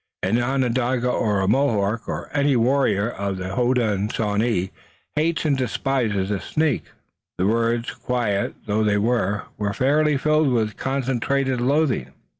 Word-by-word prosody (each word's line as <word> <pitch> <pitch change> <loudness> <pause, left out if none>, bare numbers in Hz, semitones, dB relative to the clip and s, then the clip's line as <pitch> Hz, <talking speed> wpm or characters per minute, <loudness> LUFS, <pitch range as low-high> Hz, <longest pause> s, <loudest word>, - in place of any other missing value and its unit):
An 110 +6 +2
Onondaga 125 -1 0
or 105 -5 +1
a 95 - 0
Mohawk 110 -3 +1
or - - -5
any 145 -1 +2
warrior 120 -4 +2
of 100 -2 -3
the 95 0 -5
Hodenosaunee 110 -4 0 0.4
hates 160 +2 0
and 145 -3 +3
despises 120 -6 -1
a 100 - -1
snake." 155 +7 -1 0.5
The 90 - +1
words, 115 +2 +1
quiet 115 -5 -1
though 110 0 +1
they 105 -1 +2
were, 105 -2 0 0.2
were 100 -1 -1
fairly 150 +2 +2
filled 155 +1 +2
with 110 -4 0
concentrated 135 0 -1
loathing. 130 - +1
120 Hz, 135 wpm, -22 LUFS, 105-135 Hz, 0.5 s, and